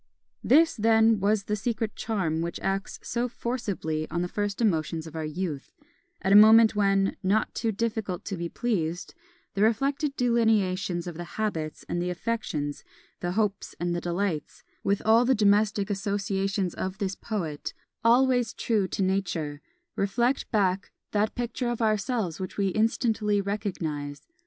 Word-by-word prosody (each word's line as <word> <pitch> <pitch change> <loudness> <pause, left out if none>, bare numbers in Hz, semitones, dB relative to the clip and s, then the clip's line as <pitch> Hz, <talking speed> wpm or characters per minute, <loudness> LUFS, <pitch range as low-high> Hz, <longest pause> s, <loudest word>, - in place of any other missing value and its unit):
This, 325 +5 +5
then, 225 -1 +4
is 205 0 +2
the 210 - -1
secret 220 0 -2
charm 180 -8 -1
which 170 +1 -3
acts 195 +1 -2
so 240 +1 -1
forcibly 200 -11 -3
on 175 +2 -1
the - - -1
first 205 +1 -3
emotions 165 -7 0
of 160 -1 -10
our 160 - -3
youth, 155 -3 -5 0.5
at 190 - +1
a - - +8
moment 220 +1 +8
when, 195 -1 +2
not 205 +3 +1
too 225 -1 -1
difficult 215 -3 -3
to 195 - -3
be 170 -1 -4
pleased, 175 -8 -2 0.4
the 200 - -2
reflected 275 +6 +1
delineations 210 -7 +1
of 175 -3 -6
the 175 - -4
habits 165 -8 -3
and 175 - -2
the 180 - -1
affections, 175 -7 -3 0.4
the 175 0 -2
hopes 205 -1 -1
and 175 0 -1
the 175 - -2
delights, 175 -3 -2 0.2
with 200 0 0
all 225 +2 +6
the 260 +1 +3
domestic 205 -1 +2
associations 195 -1 -1
of 185 0 -4
this 195 -2 -2
poet, 170 -9 -4 0.3
always 245 0 +4
true 210 -5 0
to 195 - -2
Nature, 170 -6 -1 0.3
reflect 240 +7 0
back 195 -2 +1 0.2
that 210 +1 0
picture 245 0 -2
of 240 - -2
ourselves 215 - 0
which 185 -1 -6
we 200 -1 +2
instantly 215 0 +1
recognise. 165 -8 -3
200 Hz, 155 wpm, -27 LUFS, 180-225 Hz, 0.5 s, a